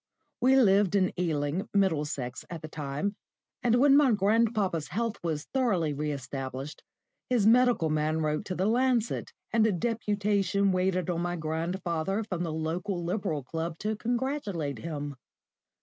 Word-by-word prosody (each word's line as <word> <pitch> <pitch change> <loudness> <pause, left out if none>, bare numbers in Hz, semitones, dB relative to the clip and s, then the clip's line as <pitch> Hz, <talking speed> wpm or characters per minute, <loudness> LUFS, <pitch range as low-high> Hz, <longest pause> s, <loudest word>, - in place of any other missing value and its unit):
We 260 +2 +5
lived 205 -6 +4
in 185 -2 +2
Ealing, 165 +4 -1
Middlesex, 150 -9 0
at 170 -3 -7
the - - -5
time, 150 +6 -3 0.5
and 235 -1 +3
when 275 +3 +6
my 285 -3 +5
grandpapa's 210 -5 +1
health 230 +2 -2
was 155 -3 -2
thoroughly 195 - +1
re 150 +1 -2
established, 135 +1 -6 0.5
his 240 -5 +2
medical 235 -8 +4
man 155 +1 +1
wrote 150 +2 0
to 185 - -4
the 185 - 0
Lancet, 240 +1 +1 0.2
and 225 -1 +4
a - - +2
deputation 200 -1 +1
waited 185 -1 +1
on 170 -1 -2
my 175 0 -1
grandfather 170 +4 -2
from 185 -5 -4
the 170 -2 -2
local 170 +4 -2
Liberal 175 -5 -2
Club 160 +4 -4
to 215 +4 -2
congratulate 215 - -2
him. 145 -1 -5
185 Hz, 150 wpm, -29 LUFS, 155-215 Hz, 0.5 s, when